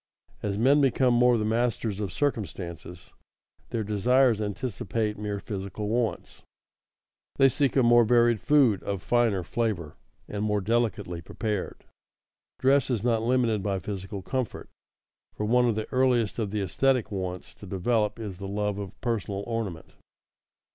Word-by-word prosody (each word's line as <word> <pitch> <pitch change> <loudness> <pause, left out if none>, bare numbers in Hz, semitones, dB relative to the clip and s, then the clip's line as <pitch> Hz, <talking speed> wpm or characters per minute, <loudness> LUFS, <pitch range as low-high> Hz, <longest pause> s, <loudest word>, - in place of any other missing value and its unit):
As 100 -1 -2
men 135 +6 +4
become 130 -2 +3
more 120 0 +4
the 105 - -1
masters 115 -2 0
of 100 -4 -3
circumstances, 90 - -4 0.6
their 115 - -2
desires 115 +3 +3
anticipate 105 +1 -2
mere 105 -1 -4
physical 100 0 -5
wants; 115 -5 -2 0.9
they 135 - +6
seek 135 +1 +1
a 135 - +4
more 120 0 +6
varied 120 -2 +3
food 130 -9 +4
of 100 -2 -4
finer 115 -6 +2
flavor 90 -6 -2 0.3
and 105 0 -4
more 105 -1 +1
delicately 105 -5 -1
prepared. 105 0 -4 0.7
Dress 135 0 +3
is 115 -5 -1
not 115 -2 +2
limited 115 -3 +1
by 100 -1 -1
physical 95 0 -6
comfort, 130 +1 -3 0.7
for 105 - -2
one 125 +2 +3
of 115 - 0
the 110 0 -3
earliest 125 -4 +2
of 105 -3 -1
the 105 +1 -2
esthetic 125 +4 +1
wants 90 -2 -5
to 100 - -12
develop 105 +4 0
is 100 -5 -7
the 100 - -5
love 105 0 -2
of 100 -1 -8
personal 105 -4 -2
ornament. 110 -8 -4
110 Hz, 145 wpm, -27 LUFS, 100-120 Hz, 0.9 s, they